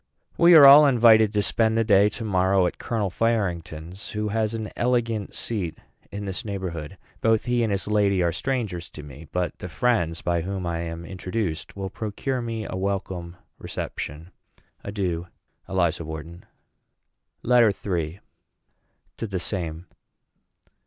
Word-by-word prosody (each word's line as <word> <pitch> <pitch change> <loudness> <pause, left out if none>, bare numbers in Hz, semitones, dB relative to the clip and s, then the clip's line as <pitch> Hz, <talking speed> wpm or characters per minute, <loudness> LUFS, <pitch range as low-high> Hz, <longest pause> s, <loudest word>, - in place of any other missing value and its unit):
We 170 0 +7
are 150 -3 +10
all 145 +2 +10
invited 110 -4 +6
to 105 -1 +1
spend 110 +1 +1
the 115 - +3
day 105 -2 +5
to 115 - -7
morrow 95 -1 +2
at - - -3
Colonel 105 -5 -2
Farington's, 90 -5 -2
who 105 0 -2
has 110 +1 -1
an 110 -1 -5
elegant 115 -4 -1
seat 100 -8 -4 0.3
in 100 0 -5
this 95 +5 -4
neighborhood. 95 -5 -5 0.2
Both 110 -1 +2
he 120 -1 +1
and 115 -2 +1
his 100 0 -1
lady 100 -3 +2
are 85 - +2
strangers 95 -5 -3
to 75 - -9
me; 75 +2 -11
but 90 -1 -2
the 90 - -6
friends 85 -4 0
by 85 -1 0
whom 95 +1 -4
I 85 -1 -2
am 85 0 -5
introduced 90 -1 -4
will 95 -1 -4
procure 120 +4 -3
me 115 -2 -4
a - - -5
welcome 95 -3 -3 0.2
reception. 80 +5 -6 0.5
Adieu. 90 -4 -3 0.4
ELIZA 85 -3 0
WHARTON. 80 +2 -8 1.0
LETTER 120 -3 +5 0.3
III. 80 +4 -5 1.0
TO 115 - -4
THE 95 -2 -3
SAME. 85 -3 -4
100 Hz, 150 wpm, -24 LUFS, 85-110 Hz, 1.0 s, are